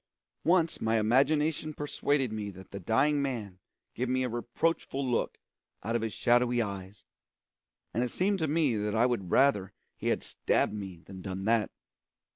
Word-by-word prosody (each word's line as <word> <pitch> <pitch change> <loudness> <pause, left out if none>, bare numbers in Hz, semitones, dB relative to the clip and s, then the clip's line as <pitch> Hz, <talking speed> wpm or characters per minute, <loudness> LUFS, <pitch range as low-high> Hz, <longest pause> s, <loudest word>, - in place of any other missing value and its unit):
Once 170 -1 +2
my 110 0 +2
imagination 150 +7 +2
persuaded 145 -4 0
me 105 -2 -3
that 95 -1 -12
the 100 - -5
dying 140 - +2
man 110 -9 -3 0.3
gave 125 +2 -2
me 130 0 +1
a 125 - -1
reproachful 135 +4 -1
look 120 - 0 0.5
out 115 +2 -1
of 120 - +1
his 110 -1 -2
shadowy 120 +1 +2
eyes, 100 -2 -4 0.9
and 120 - +1
it 125 - -1
seemed 195 - +1
to 160 - +1
me 150 -5 +2
that 105 0 -1
I 115 +2 +4
would 115 -8 -1
rather 105 -8 +3 0.2
he - - -5
had - - +1
stabbed - - 0
me 95 -5 -7
than 95 -1 -9
done 95 +1 -5
that. 115 0 +2
120 Hz, 170 wpm, -30 LUFS, 105-140 Hz, 0.9 s, I